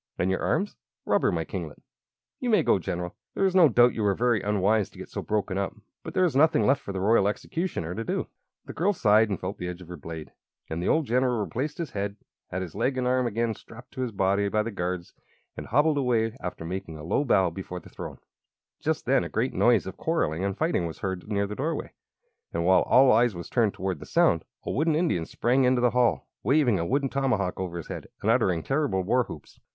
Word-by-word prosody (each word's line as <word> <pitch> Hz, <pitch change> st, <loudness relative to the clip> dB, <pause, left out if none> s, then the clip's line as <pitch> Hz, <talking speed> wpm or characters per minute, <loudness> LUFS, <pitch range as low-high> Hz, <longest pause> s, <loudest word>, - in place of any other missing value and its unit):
"And 90 Hz, +2 st, +1 dB
your 95 Hz, -, -1 dB
arms?" 205 Hz, -, 0 dB, 0.3 s
"Rubber, -, -, +2 dB
my -, -, -1 dB
kinglet." -, -, -6 dB, 0.6 s
"You 250 Hz, -, -2 dB
may 215 Hz, -, +4 dB
go, -, -, +3 dB
General. 90 Hz, 0 st, -4 dB, 0.2 s
There 195 Hz, -, +2 dB
is 190 Hz, -, +2 dB
no 180 Hz, -5 st, +7 dB
doubt 120 Hz, +1 st, +5 dB
you 110 Hz, -, -3 dB
were 100 Hz, -2 st, +2 dB
very 120 Hz, -2 st, +2 dB
unwise 105 Hz, 0 st, +1 dB
to -, -, -18 dB
get -, -, -9 dB
so -, -, -4 dB
broken 100 Hz, -2 st, -1 dB
up; 100 Hz, -, -2 dB, 0.3 s
but -, -, -8 dB
there 185 Hz, -, +4 dB
is 160 Hz, -7 st, 0 dB
nothing 155 Hz, +3 st, +4 dB
left 135 Hz, 0 st, +3 dB
for -, -, -6 dB
the 95 Hz, -, -3 dB
Royal 100 Hz, +1 st, +3 dB
Executioner 105 Hz, -, -3 dB
to 115 Hz, -, -4 dB
do." -, -, -2 dB, 0.4 s
The -, -, -8 dB
girl 195 Hz, +6 st, +1 dB
sighed 110 Hz, -, +4 dB
and 100 Hz, -, -2 dB
felt 95 Hz, +3 st, -5 dB
the 90 Hz, -, -3 dB
edge 90 Hz, 0 st, -6 dB
of 90 Hz, -2 st, -13 dB
her 90 Hz, -, -7 dB
blade; 80 Hz, +1 st, -8 dB, 0.4 s
and 80 Hz, +2 st, -2 dB
the -, -, -2 dB
old 160 Hz, -1 st, +2 dB
general 125 Hz, -1 st, +1 dB
replaced 135 Hz, +8 st, -3 dB
his 165 Hz, -6 st, -4 dB
head, 100 Hz, 0 st, -3 dB, 0.3 s
had 95 Hz, +1 st, -3 dB
his 85 Hz, -, -8 dB
leg 130 Hz, 0 st, 0 dB
and 130 Hz, -, 0 dB
arm 125 Hz, 0 st, +2 dB
again 115 Hz, 0 st, 0 dB
strapped 120 Hz, +3 st, -14 dB
to 130 Hz, -, -5 dB
his 125 Hz, -2 st, -2 dB
body 100 Hz, 0 st, +1 dB
by 105 Hz, +1 st, +1 dB
the 115 Hz, -, -4 dB
guards, 90 Hz, -2 st, -4 dB, 0.4 s
and -, -, -7 dB
hobbled 145 Hz, +4 st, +3 dB
away 115 Hz, -3 st, +1 dB
after 90 Hz, -2 st, -6 dB
making 85 Hz, -2 st, -5 dB
a 75 Hz, -, -9 dB
low 90 Hz, -, +1 dB
bow 95 Hz, -10 st, +3 dB
before 90 Hz, +1 st, -6 dB
the -, -, -15 dB
throne. -, -, -8 dB, 0.6 s
Just -, -, -1 dB
then -, -, +3 dB
a -, -, -5 dB
great -, -, -1 dB
noise -, -, +3 dB
of -, -, -7 dB
quarrelling 80 Hz, +4 st, 0 dB
and 100 Hz, 0 st, -2 dB
fighting 155 Hz, -, 0 dB
was 80 Hz, -, -7 dB
heard 95 Hz, -1 st, -4 dB
near 100 Hz, -1 st, 0 dB
the 100 Hz, -, -5 dB
doorway, 155 Hz, +5 st, -3 dB, 0.6 s
and 85 Hz, 0 st, -1 dB
while 95 Hz, +1 st, +5 dB
all 130 Hz, 0 st, +5 dB
eyes 115 Hz, -2 st, +3 dB
were 85 Hz, -, -5 dB
turned 110 Hz, -1 st, +1 dB
toward 95 Hz, -4 st, -3 dB
the -, -, -10 dB
sound, 80 Hz, -, +3 dB, 0.2 s
a -, -, -2 dB
wooden 155 Hz, +4 st, +1 dB
Indian 155 Hz, -, 0 dB
sprang 125 Hz, +3 st, +1 dB
into 125 Hz, 0 st, +3 dB
the 120 Hz, -1 st, +3 dB
hall, 125 Hz, 0 st, +2 dB
waving 130 Hz, -, +3 dB
a 85 Hz, -, -1 dB
wooden 140 Hz, +1 st, +1 dB
tomahawk 125 Hz, -9 st, 0 dB
over 90 Hz, -2 st, -4 dB
his 85 Hz, -, -7 dB
head, -, -, -6 dB, 0.2 s
and 110 Hz, -, +3 dB
uttering 95 Hz, -9 st, +2 dB
terrible 135 Hz, -9 st, 0 dB
war 125 Hz, +6 st, +2 dB
whoops. -, -, -11 dB
110 Hz, 235 wpm, -27 LUFS, 95-130 Hz, 0.6 s, no